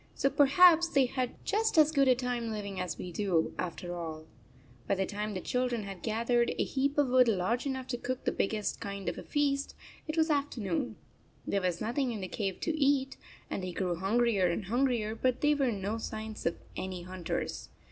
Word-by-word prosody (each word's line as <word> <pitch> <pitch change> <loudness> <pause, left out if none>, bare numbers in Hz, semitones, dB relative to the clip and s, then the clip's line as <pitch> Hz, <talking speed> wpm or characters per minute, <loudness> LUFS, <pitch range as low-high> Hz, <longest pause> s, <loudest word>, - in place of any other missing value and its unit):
So 275 - +1
perhaps 335 +4 +6
they 275 -5 +3
had 250 0 -2
just 435 -1 +1
as 310 -1 +7
good 275 -3 +3
a 255 - +6
time 245 -2 -2
living 200 -3 -4
as 180 -1 -3
we 180 - -6
do, 175 -3 0
after 175 0 -4
all. 160 -2 -6 0.6
By 200 - +2
the 190 0 0
time 210 +1 -4
the 185 - -3
children 250 -3 -1
had 195 -3 -7
gathered 235 +2 +1
a - - +2
heap 280 +1 -1
of 290 -2 +4
wood 255 -1 +5
large 225 +5 +1
enough 260 -1 -3
to 245 -2 -2
cook 255 +1 -3
the - - +2
big - - 0
gest 215 -2 -2
kind 200 -1 -5
of - - -2
a - - -8
feast, 280 -1 0 0.3
it 310 +1 -3
was 320 0 +3
afternoon. 220 - -1 0.5
There 200 - 0
was 180 -2 -1
nothing 245 +4 0
in 215 -3 -4
the 185 - -3
cave 195 -1 -3
to 325 - 0
eat, 275 -2 +2 0.3
and - - -3
they 180 -1 -4
grew 180 -1 -1
hungrier 200 +2 +2
and 175 +4 -2
hungrier, 235 -1 +1
but 255 +2 0
there 295 0 +4
were 270 -4 +2
no 205 +2 -3
signs 220 -2 -5
of 165 - -1 0.2
any 185 -2 -4
hunters. 180 -2 -4
230 Hz, 210 wpm, -31 LUFS, 195-270 Hz, 0.6 s, as